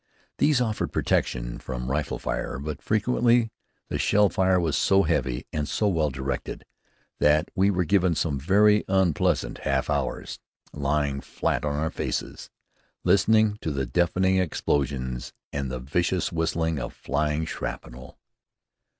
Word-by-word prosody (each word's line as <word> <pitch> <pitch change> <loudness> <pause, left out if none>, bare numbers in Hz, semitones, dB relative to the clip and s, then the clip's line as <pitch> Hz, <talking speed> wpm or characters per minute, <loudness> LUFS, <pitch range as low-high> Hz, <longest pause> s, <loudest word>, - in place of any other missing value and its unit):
These 145 -2 +4
offered 110 -3 -1
protection - - -1
from 65 0 -5
rifle 75 +2 -1
fire, - - -3
but 75 +1 -5
frequently 115 +1 +2 0.4
the - - -3
shell 105 0 +4
fire 95 +1 +2
was 80 -4 0
so 95 0 +4
heavy 70 -6 -1
and 75 -2 -1
so 105 - +1
well 80 -6 +1
directed 65 +1 -4 0.5
that 75 +1 +3
we 100 0 +3
were 90 -3 +1
given 90 0 +2
some 75 -3 -1
very 105 +7 +4
unpleasant 90 -10 +1
half 70 +1 0
hours, 70 -3 -2 0.3
lying 70 -1 -1
flat - - -2
on 75 -1 -1
our 80 +2 -1
faces, - - -4 0.5
listening 110 +1 +3
to - - -2
the 70 -3 -1
deafening 90 +7 +2
explosions 70 -7 -1 0.2
and 70 -2 -2
the 65 - -3
vicious 85 +8 0
whistling 80 -1 0
of - - -5
flying 75 +3 -1
shrapnel. 65 -4 -7
80 Hz, 140 wpm, -26 LUFS, 70-95 Hz, 0.5 s, These